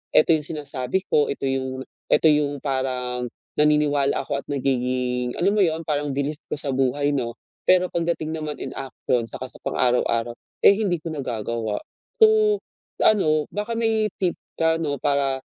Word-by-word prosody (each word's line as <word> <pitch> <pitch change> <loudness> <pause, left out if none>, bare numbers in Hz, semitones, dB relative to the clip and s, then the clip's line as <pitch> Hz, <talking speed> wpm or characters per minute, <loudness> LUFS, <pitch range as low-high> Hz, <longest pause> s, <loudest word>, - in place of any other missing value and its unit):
ito 165 - +6
'yong 155 -2 +2
sinasabi 145 +2 -3
ko, 150 - +4
ito - - -6
'yong 130 0 -2 0.3
ito 160 - +5
'yong 145 -1 +1
parang 125 -2 -2 0.3
naniniwala 150 -2 +3
ako 140 - -2
at - - -31
nagiging, 125 -2 -1
alam 195 +4 +3
mo 210 - +3
'yon, 165 -3 +1
parang 145 -1 -1
belief 145 +2 -2
ko - - -1
sa 140 -1 -1
buhay, 135 +2 +1
'no." 120 -4 -2 0.3
Pero 185 0 +5
pagdating 165 -2 -1
naman 155 -1 -5
in - - -5
action 125 -2 -2
'tsaka 130 - -6
sa - - -12
pang - - -3
araw-araw, 120 -1 +1 0.3
eh, - - +10
hindi 195 -6 0
ko 165 - -8
nagagawa. 115 -5 -3 0.4
So, 435 -1 +5 0.4
ano, 155 -8 +3
baka 210 +3 -3
may 220 -2 +1
tip 180 -3 +1 0.2
ka 160 0 +3
'no 145 -4 -2
para 140 -2 +1
145 Hz, 165 wpm, -23 LUFS, 130-165 Hz, 0.4 s, eh